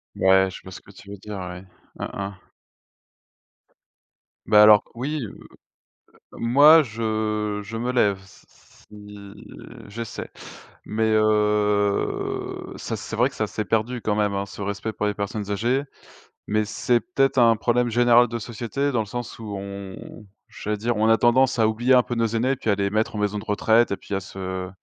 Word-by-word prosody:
Ouais, 95 0 +4
je - - -10
vois 95 - -12
ce - - -9
que 100 - -17
tu 100 +1 -15
veux 100 - -8
dire, 105 +1 -8
ouais. 90 0 -7 0.4
Hein, - - -4
hein. 100 0 -5 2.1
Bah 105 -1 +6
alors 105 -1 +7
que - - -29
oui, 145 +4 -3
heu - - -8 1.0
heu, - - -12
moi 145 +7 +6
je 110 -3 -2
je 115 +3 -7
me 125 +2 -2
lève 105 -5 +2
s 95 - -19
s - - -24
si 105 -1 -12 0.4
j'essaie. 115 +2 -7 0.6
Mais 110 +1 0
heu, 105 -1 0
ça - - -4
c'est 110 - -7
vrai 120 +4 +2
que 130 - -16
ça 110 - -1
s'est 110 - -4
perdu 115 +3 -1
quand 105 -1 -1
même, 105 -1 +1
hein, 100 0 -2
ce 100 - -10
respect 100 +2 -3
pour - - -3
les 105 - 0
personnes 100 0 -4
âgées. 120 +7 0 0.6
Mais 110 +1 +1
c'est 120 +3 +1
peut-être 135 -6 0
un 115 -1 +5
problème 120 +1 +1
général 120 +1 +5
de 115 - -4
société 120 +5 -3
dans 115 - +1
le - - -4
sens 120 +3 -6
où 110 -2 -7
on 100 +2 -9 0.2
j'allais 105 0 -4
dire 115 +2 -1
on 110 +1 +2
a 115 - +5
tendance 125 +2 +3
à 110 - +4
oublier 120 +4 +1
un 125 - +6
peu 120 - -4
nos 115 0 +1
aînés 115 +4 0
et - - +1
puis - - -3
à 100 - +3
les 100 0 -1
mettre 110 +1 -1
en - - -3
maison 105 0 -1
de 100 - -6
retraite 110 +2 +2
et 100 - -1
puis - - -9
à 95 - 0
se 95 -1 -6
110 Hz, 195 wpm, -23 LUFS, 100-120 Hz, 2.1 s, alors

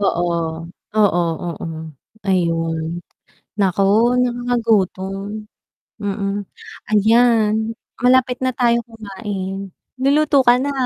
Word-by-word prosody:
Oo. 185 -3 +1 0.7
Oo, 205 -5 +4 0.2
oo, 170 -2 -5 0.6
ayun. 165 -3 0 0.7
Naku, 195 -1 +2 0.4
nakagagutom. 220 -5 0 0.7
Mm. 200 0 -2 0.5
Ayan, 220 0 +4 0.5
malapit 250 0 +3
na 255 - +1
tayo 235 -1 +3
kumain. 195 -3 -6 0.3
Luluto 285 +1 +3
ka 240 - +7
na. 280 +2 -1
210 Hz, 85 wpm, -19 LUFS, 195-245 Hz, 0.7 s, ka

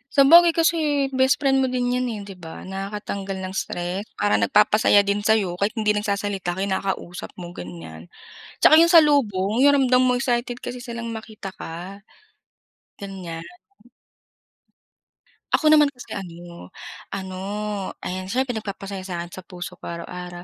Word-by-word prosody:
Sabagay 335 +5 +8
kasi 330 0 +2 0.4
bestfriend 270 +1 +3
mo 260 - +2
din 245 -1 0
yan 250 0 0
eh, 215 -2 -4
di 195 - -9
ba, 170 -2 -10
nakakatanggal 195 0 -5
ng 185 - -6
stress. 180 0 -3 0.2
Parang 105 0 +2
nagpapasaya 205 - +4
din 200 +1 0
sa 220 +1 +4
'yo 185 -4 -2
kahit 215 +3 0
hindi 210 -1 +2
nagsasalita, 200 -3 -2
kinakausap 190 -2 -3
mo, 175 -1 -8
ganiyan. 85 - -10 0.5
Tsaka 310 - +8
yung 335 +1 +6
salubong, 230 - +4
yung 285 - +6
ramdam 255 0 +4
mong 250 0 +2
excited 245 -1 -1
kasi 250 - -6
silang 235 -2 -6
makita 220 -3 -7
ka, 175 +4 -7 1.0
ganiyan. 185 -5 -7 2.1
Ako 310 -1 +3
naman 300 -1 +7
kasi 250 - -12
ano, 175 - -8 0.5
ano, 190 -1 -5 0.7
ayan, 185 +1 -4
siyempre 255 +4 0
nagpapasayaya 195 -2 -7
sa 180 - -4
'kin, 175 - -12
sa 185 - -9
puso 180 -1 -8
ko - - -12
araw-araw. 175 +1 -7
200 Hz, 145 wpm, -23 LUFS, 180-245 Hz, 2.1 s, Sabagay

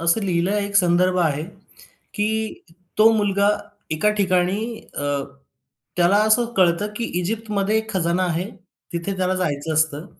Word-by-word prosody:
असं 170 +5 +2
लिहिलं 185 0 0
एक 200 0 -4
संदर्भ 180 0 +3
आहे, 155 -4 +1 0.5
की 220 +1 -3 0.3
तो 215 +1 +7
मुलगा 200 -1 +2 0.4
एका 160 +7 +2
ठिकाणी 185 -1 +2 0.4
अ, - - -2 0.9
त्याला 180 +3 +4
असं 220 +2 +4
कळतं, 185 +2 +3
की 235 - -3 0.2
इजिप्तमध्ये 210 +1 -1
एक 220 0 -3
खजाना 175 0 +1
आहे. 175 +3 -2 0.4
तिथे 170 +3 -3
त्याला 185 0 0
जायचं 160 -3 -2
असतं. 155 0 0
185 Hz, 135 wpm, -22 LUFS, 170-205 Hz, 0.9 s, तो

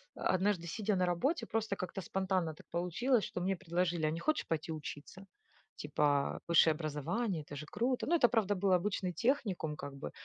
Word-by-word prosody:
однажды, 185 -2 +1
сидя 210 +3 -1
на 185 0 +2
работе, 255 - 0
просто 220 -2 -1
как-то 185 +1 -4
спонтанно 185 -3 -1
так - - -16
получилось, 195 +7 +1
что - - -5
мне 190 +1 +1
предложили: 175 -2 0
"А - - +1
не 165 - -3
хочешь 310 - 0
пойти 160 0 -2
учиться?" 155 +5 -7 0.6
Типа, 145 -1 +1
"Высшее 165 -1 +6
образование 155 - -2
это 145 - -9
же 150 +2 -6
круто!" 245 +5 -1
Ну 340 - +4
это, 240 - +6
правда, 205 -4 +2
был 190 0 +2
обычный 185 -1 0
техникум, 205 - 0
как 140 -2 -7
бы, 75 - -6
180 Hz, 180 wpm, -34 LUFS, 160-205 Hz, 0.6 s, Высшее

